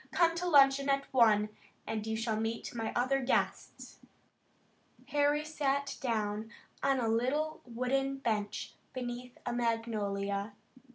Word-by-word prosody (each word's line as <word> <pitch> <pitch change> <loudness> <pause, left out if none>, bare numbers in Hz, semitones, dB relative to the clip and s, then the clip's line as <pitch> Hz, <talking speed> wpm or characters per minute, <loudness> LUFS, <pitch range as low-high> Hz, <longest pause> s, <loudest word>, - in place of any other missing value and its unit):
Come 335 -1 +4
to 360 +1 -1
luncheon 275 -2 +6
at 275 0 0
one, 215 -4 +5 0.4
and 220 -1 -3
you 220 0 -1
shall 225 -1 -1
meet 225 +1 -3
my 225 -2 -2
other 255 +3 +2
guests." 260 - -1 1.1
Harry 290 +1 +2
sat 280 -2 -1
down 215 -3 -1 0.3
on 275 -1 +2
a 235 - 0
little 265 +8 0
wooden 270 +3 0
bench 215 -6 -2 0.2
beneath 245 -1 -5
a 245 - -1
magnolia. 210 -4 -1
245 Hz, 125 wpm, -32 LUFS, 220-275 Hz, 1.1 s, luncheon